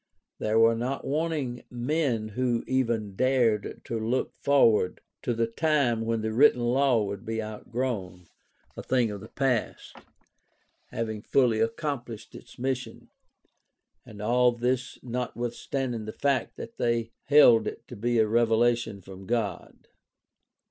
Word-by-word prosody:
There 110 +1 +1
were 115 0 +6
not 125 +4 -3
wanting 145 -4 -2
men 125 -3 -1
who 120 +1 -1
even 115 -6 -1
dared 120 -4 +1
to 115 - -3
look 115 +4 -1
forward 115 -10 +3 0.2
to 120 - -1
the 115 0 +1
time 120 -2 +1
when 115 -1 0
the 110 0 -2
written 125 0 +5
law 125 -1 +3
would 100 +1 -5
be 115 0 -3
outgrown, 110 -4 -4 0.5
a - - -6
thing 125 -4 +1
of 100 -1 -7
the - - -10
past, 130 -5 -2 0.9
having 110 -3 -4
fully 120 -2 +2
accomplished 115 0 -3
its - - -13
mission 130 0 -4 0.5
— - - -51
and 105 0 -10
all 125 +2 +4
this 125 +2 -2
notwithstanding 120 0 -3
the 110 - -6
fact 140 -2 0
that 230 - -9
they 115 -1 0
held 130 -6 +6
it - - -7
to - - -9
be 120 +3 0
a 110 - +5
revelation 115 -1 +2
from 95 0 -11
God. 110 -6 -3
120 Hz, 140 wpm, -27 LUFS, 110-130 Hz, 0.9 s, were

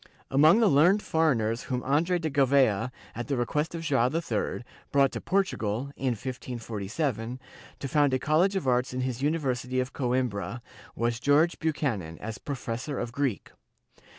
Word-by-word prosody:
Among 155 +9 +6
the 225 - +5
learned 175 +8 +4
foreigners 120 -8 +1
whom 125 -1 -2
Andre 160 +7 +2
de 165 -2 -2
Gou 140 -2 +3
v^a, 125 -4 +3 0.2
at 120 +1 -5
the 140 - -1
request 150 +7 -1
of 165 - -5
Joao 135 -6 +2
III, 135 -8 -2 0.3
brought 140 -1 +4
to - - -5
Portugal, 140 - -1
in 130 -2 0
1547, 120 0 -4 0.4
to 140 - -5
found 145 0 +3
a 130 - +2
college 170 +9 +2
of 185 -8 -1
arts 125 0 +1
in 130 - -1
his 130 -1 -3
University 130 -4 0
of 130 +1 -2
Coimbra, 120 -4 -2 0.3
was 120 0 -1
George 145 +6 +3
Buchanan, 120 - -2
as 110 0 -6
professor 130 0 -4
of 120 -1 -3
Greek. 135 -4 -2
130 Hz, 160 wpm, -28 LUFS, 120-150 Hz, 0.4 s, Among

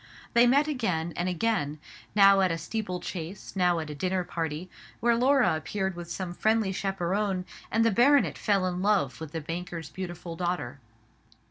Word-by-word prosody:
They 235 +1 +6
met 280 +4 +4
again 185 - -1
and 175 +1 -1
again; 180 -5 0 0.4
now 195 -1 +7
at 185 -2 +3
a 165 - -1
steeple 180 +1 -4
chase, 175 +3 -7
now 180 -2 +3
at 155 -2 -4
a - - -5
dinner 185 +4 -1
party, 165 0 -4 0.3
where 235 +1 +3
Laura 260 - +3
appeared 190 +4 -3
with 170 -1 -8
some 180 -1 -4
friendly 220 +1 +1
chaperon; 195 0 -1 0.2
and 225 0 +2
the 230 - +4
baronet 275 +7 +4
fell 200 -3 +1
in 180 0 -2
love 195 -9 +1
with 160 -2 -6
the 165 0 -4
banker's 165 0 -5
beautiful 175 -2 -6
daughter. 175 -6 -3
185 Hz, 170 wpm, -28 LUFS, 170-210 Hz, 0.4 s, now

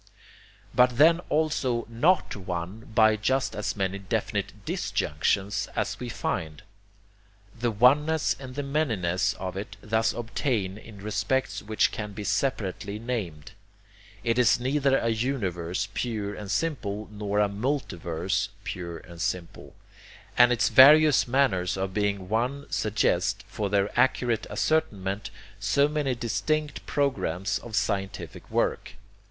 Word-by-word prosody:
But 125 -1 +4
then 165 +4 +6
also 140 -6 0
NOT 150 +11 +2
one 90 +2 -5
by 110 -1 +6
just 130 +5 0
as 105 - -2
many 95 -1 -1
definite 95 - -3
DISjunctions 95 +7 -1
as - - -2
we - - -5
find. 80 +1 -3 1.0
The 120 +1 +1
oneness 145 +8 +3
and 130 -2 -9
the 145 - -2
manyness 110 - 0
of 95 -1 -5
it 100 +2 -6
thus 110 +1 +1
obtain 115 -4 -2
in 100 -3 -12
respects 110 0 -1
which 110 +1 +1
can 105 -2 -5
be 105 +1 -6
separately 105 -2 -1
named. 105 -11 -4 0.7
It 115 +1 +1
is 120 0 +4
neither 135 +1 +2
a 115 - 0
universe 100 -8 -1
pure 105 -4 -2
and 105 -1 -8
simple 110 -7 -2
nor 105 -1 -2
a 105 - +4
multiverse 100 - -2
pure 90 -5 -5
and 85 0 -11
simple. 90 -4 -4 0.6
And 120 0 +6
its 120 -1 +2
various 150 +1 +7
manners 115 -9 +1
of 95 0 -2
being 100 -2 -1
one 125 +7 -1
suggest, 105 0 0
for 105 -2 -3
their 100 0 +1
accurate 120 -3 +2
ascertainment, 105 -5 -1 0.3
so 140 +8 +3
many 145 -4 -1
distinct 150 +6 -2
programs 100 - 0
of 115 -3 -7
scientific 100 -3 -3
work. - - -1
110 Hz, 130 wpm, -27 LUFS, 100-130 Hz, 1.0 s, various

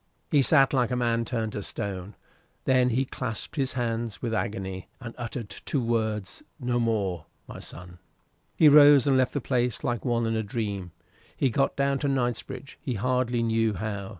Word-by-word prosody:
He 145 - +5
sat 135 0 +4
like 125 -3 +2
a 125 - -1
man 115 -1 +1
turned 115 -2 -2
to 105 - -3
stone; 100 0 -5 0.5
then 130 -1 +4
he 130 +3 +1
clasped 125 -1 -5
his 135 -3 -1
hands 115 -4 -2
with 115 -2 -3
agony, 95 -4 -3
and 120 -3 -8
uttered 120 -1 -5
two 140 - -3
words 110 - -1 0.2
no 125 -2 0
more 100 -8 -1 0.2
"My - - -9
son!" 90 0 -10 0.6
He 160 - +6
rose 145 -2 +8
and 135 - +3
left 130 -1 +2
the 145 - -1
place 125 -2 0
like 120 -2 -1
one 120 -2 +1
in 115 0 0
a 110 - +1
dream. 100 -4 -4 0.5
He 135 - +2
got 135 +4 +1
down 140 0 +1
to 145 - -1
Knightsbridge, 130 0 -3
he 130 -6 -3
hardly 125 +1 0
knew 115 -1 +1
how. 100 0 -4
120 Hz, 180 wpm, -27 LUFS, 110-130 Hz, 0.6 s, rose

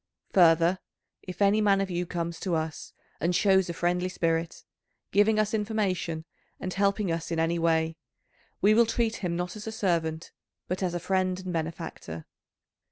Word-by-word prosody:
Further, 170 0 +5 0.4
if 185 +2 -3
any 205 +2 +4
man 200 -2 +4
of 195 -1 -1
you 175 0 -2
comes 170 -1 -3
to 180 -3 -1
us 160 0 -4 0.3
and 175 +2 +1
shows 190 -1 +3
a - - -2
friendly 180 +2 0
spirit, 165 -2 -1 0.5
giving 210 +2 +4
us 215 0 +1
information 200 -7 -1 0.3
and 185 - -4
helping 200 -1 +1
us 165 0 -3
in 165 - -2
any 165 +1 +1
way, 160 -1 +1 0.6
we 205 +2 +5
will 230 +1 +5
treat 230 0 0
him 175 -3 -2
not 180 +2 -3
as 215 +2 -8
a - - -2
servant, 165 -6 -1 0.4
but 180 +2 -3
as 180 -2 -1
a - - -1
friend 185 +1 0
and 185 -1 -5
benefactor. 160 - -5
180 Hz, 170 wpm, -28 LUFS, 165-200 Hz, 0.6 s, Further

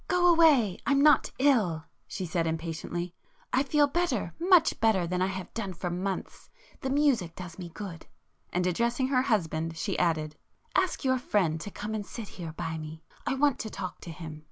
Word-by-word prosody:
"Go 360 0 +2
away,—I'm 280 - +4
not 300 0 +5
ill,"—she 205 - 0
said 165 0 0
impatiently—"I 175 - -4
feel 290 +1 +3
better,—much 335 - +2
better 220 -6 +3
than 180 +1 -1
I 185 - +3
have 190 -1 -6
done 200 -5 -3
for 175 +1 -4
months. 185 +2 -4 0.3
The 265 - -3
music 265 - +2
does 180 -1 -9
me 175 -2 -6
good." 175 -2 -8 0.4
And 180 0 0
addressing 235 +8 +1
her 255 -2 +3
husband, 165 - 0
she 195 +3 -2
added—"Ask 165 - -1
your 260 -1 +3
friend 170 -9 +1
to 205 - -5
come 210 +2 -5
and 215 -1 -2
sit 215 +1 -8
here 165 -3 -7
by 160 0 -4
me,—I 160 +10 -6
want 285 -1 +2
to 220 - -4
talk 190 -3 -6
to - - -9
him. 160 -2 -8
195 Hz, 165 wpm, -29 LUFS, 165-265 Hz, 0.4 s, not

